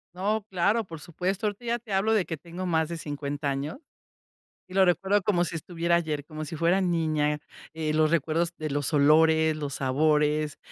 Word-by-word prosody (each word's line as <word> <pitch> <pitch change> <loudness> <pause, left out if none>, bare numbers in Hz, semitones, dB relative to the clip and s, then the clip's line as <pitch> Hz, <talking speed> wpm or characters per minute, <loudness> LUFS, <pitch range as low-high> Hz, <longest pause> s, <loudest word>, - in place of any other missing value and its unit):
No, 205 +3 -1
claro, 200 +5 +1
por 165 -3 -9
supuesto. 185 +6 -2
Ahorita 205 +4 -5
ya 235 0 0
te 220 -4 -8
hablo 205 +4 +2
de 205 -5 +2
que 160 - -4
tengo 175 +4 -7
más 160 -3 +1
de 170 - -4
50 145 -1 -4
años 140 - -3 0.9
y 185 - -13
lo 190 0 +5
recuerdo 195 +3 +2
como 180 -3 +2
si 170 - -5
estuviera 170 +1 -2
ayer, 155 -4 -1
como 155 0 -6
si 155 +2 -6
fuera 170 +5 +2
niña. 155 -4 +1 0.4
Eh, 155 -1 -2
los 155 0 +3
recuerdos 165 +1 +1
de 155 -2 -4
los 145 0 -1
olores, 160 +2 +4
los 145 -3 -4
sabores. 150 +2 +1
160 Hz, 190 wpm, -27 LUFS, 150-185 Hz, 0.9 s, lo